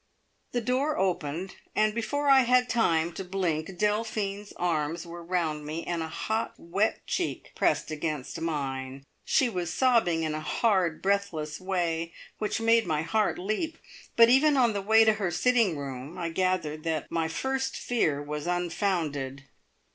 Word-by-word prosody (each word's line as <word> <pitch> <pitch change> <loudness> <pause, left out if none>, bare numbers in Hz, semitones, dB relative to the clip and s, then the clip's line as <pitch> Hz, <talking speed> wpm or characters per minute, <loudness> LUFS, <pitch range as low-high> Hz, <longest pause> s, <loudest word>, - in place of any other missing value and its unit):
The 245 - 0
door 260 +6 0
opened, 180 -1 -2 0.2
and 215 0 +3
before 285 +6 -1
I 270 -1 +8
had 250 0 +4
time 170 -7 +2
to 195 - -5
blink 180 -2 -2
Delphine's 210 -1 -1
arms 165 -1 -1
were 170 0 -8
round 165 -4 -1
me, 155 +3 -5
and 170 -1 -2
a 160 - -3
hot, 220 +7 -2
wet 195 +6 -1
cheek - - -3
pressed - - +1
against 155 0 -4
mine. 135 -4 -3 0.2
She 265 - +3
was 180 -7 -3
sobbing 225 -9 +3
in 155 -1 -1
a 155 - -2
hard, 180 -1 +1
breathless 190 -6 -1
way 170 -3 -1 0.3
which 215 +2 -1
made 225 -2 +3
my 155 -1 0
heart 210 +6 +1
leap; 215 - -2 0.4
but 230 0 +8
even 275 +4 +5
on 240 -4 +4
the 200 - -2
way 220 +3 +5
to 220 - +5
her 205 -4 -1
sitting 205 0 +2
room 135 +2 -6
I 170 -2 -2
gathered 165 -3 -1
that 160 -3 -1
my 165 -1 0
first 265 +10 -2
fear 155 -12 0
was 150 +2 -5
unfounded. 165 -7 -1
180 Hz, 160 wpm, -28 LUFS, 160-220 Hz, 0.4 s, I